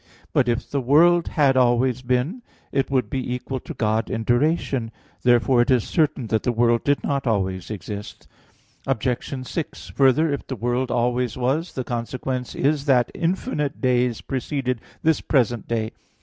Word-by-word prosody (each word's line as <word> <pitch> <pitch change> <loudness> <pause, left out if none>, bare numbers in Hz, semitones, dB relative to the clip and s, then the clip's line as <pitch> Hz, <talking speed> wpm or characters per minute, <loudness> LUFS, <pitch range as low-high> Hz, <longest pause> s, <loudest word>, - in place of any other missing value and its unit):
But 125 - +3
if 120 +1 -1
the 140 - -1
world 165 +7 +4
had 140 -4 +3
always 125 0 +3
been, 130 - -1 0.3
it 135 - 0
would 130 -2 +1
be 130 -3 -2
equal 130 +1 -4
to - - -9
God 110 0 0
in 115 - -2
duration. 125 -1 +1 0.3
Therefore 120 0 +4
it 120 - 0
is 125 -4 +4
certain 150 -6 0
that 110 0 +1
the 125 - 0
world 120 0 +2
did 145 0 +1
not 140 -2 -1
always 95 -4 -1
exist. 105 0 -7 0.6
Obj. 130 +1 -2
6: 165 - -5
Further, 140 +3 +3
if 140 - -5
the 130 - -3
world 120 +3 -1
always 120 0 0
was, 135 +7 -1
the 130 - -3
consequence 125 +1 -4
is 145 0 +1
that 125 -4 +3
infinite 165 - -2
days 125 -3 +1
preceded 130 -2 -2 0.2
this 160 -1 +3
present 120 -4 +1
day. 110 -1 -1
125 Hz, 165 wpm, -23 LUFS, 120-140 Hz, 0.6 s, world